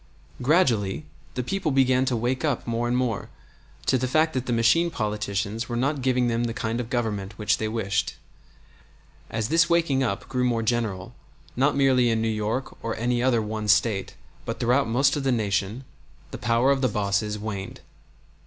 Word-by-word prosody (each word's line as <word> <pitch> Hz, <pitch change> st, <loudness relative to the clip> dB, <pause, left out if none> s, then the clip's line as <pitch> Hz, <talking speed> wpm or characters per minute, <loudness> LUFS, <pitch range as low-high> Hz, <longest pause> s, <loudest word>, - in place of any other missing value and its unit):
Gradually 115 Hz, -, +2 dB, 0.3 s
the 125 Hz, -, -1 dB
people 190 Hz, +4 st, -1 dB
began 130 Hz, -1 st, +3 dB
to 125 Hz, -, 0 dB
wake 125 Hz, +4 st, -1 dB
up 145 Hz, -6 st, 0 dB
more 120 Hz, 0 st, -1 dB
and 120 Hz, +1 st, +1 dB
more 120 Hz, -5 st, -1 dB, 0.6 s
to 130 Hz, -, +2 dB
the 130 Hz, -, -1 dB
fact 155 Hz, +4 st, +2 dB
that 130 Hz, -1 st, -2 dB
the -, -, -1 dB
machine 115 Hz, +9 st, +3 dB
politicians 105 Hz, -2 st, -2 dB
were 120 Hz, -, -2 dB
not 135 Hz, +4 st, 0 dB
giving 125 Hz, -1 st, +2 dB
them 120 Hz, 0 st, 0 dB
the 115 Hz, -1 st, -3 dB
kind 115 Hz, -1 st, -2 dB
of 120 Hz, -2 st, -4 dB
government 105 Hz, -5 st, -2 dB
which 105 Hz, -, +1 dB
they 110 Hz, -, -1 dB
wished. 100 Hz, -3 st, -1 dB, 1.1 s
As 110 Hz, 0 st, -2 dB
this 165 Hz, +1 st, +4 dB
waking 165 Hz, -6 st, +2 dB
up 115 Hz, -7 st, -2 dB
grew 125 Hz, -1 st, -1 dB
more 120 Hz, -2 st, +1 dB
general, 110 Hz, -2 st, -1 dB, 0.4 s
not 140 Hz, +3 st, +2 dB
merely 130 Hz, -3 st, +4 dB
in 115 Hz, -1 st, +1 dB
New 110 Hz, -, 0 dB
York 110 Hz, +4 st, -2 dB
or 115 Hz, -, -2 dB
any 120 Hz, +1 st, 0 dB
other 120 Hz, -3 st, +2 dB
one 105 Hz, 0 st, -4 dB
State, 100 Hz, -1 st, +2 dB, 0.3 s
but -, -, -5 dB
throughout 125 Hz, +3 st, +2 dB
most 135 Hz, +5 st, +3 dB
of 145 Hz, -, -2 dB
the 135 Hz, -, +2 dB
Nation, 105 Hz, +1 st, -1 dB, 0.5 s
the -, -, -6 dB
power 115 Hz, +4 st, +2 dB
of 135 Hz, -1 st, +1 dB
the 130 Hz, -, +3 dB
bosses 105 Hz, 0 st, -1 dB
waned. 100 Hz, -2 st, -6 dB
120 Hz, 185 wpm, -25 LUFS, 110-130 Hz, 1.1 s, this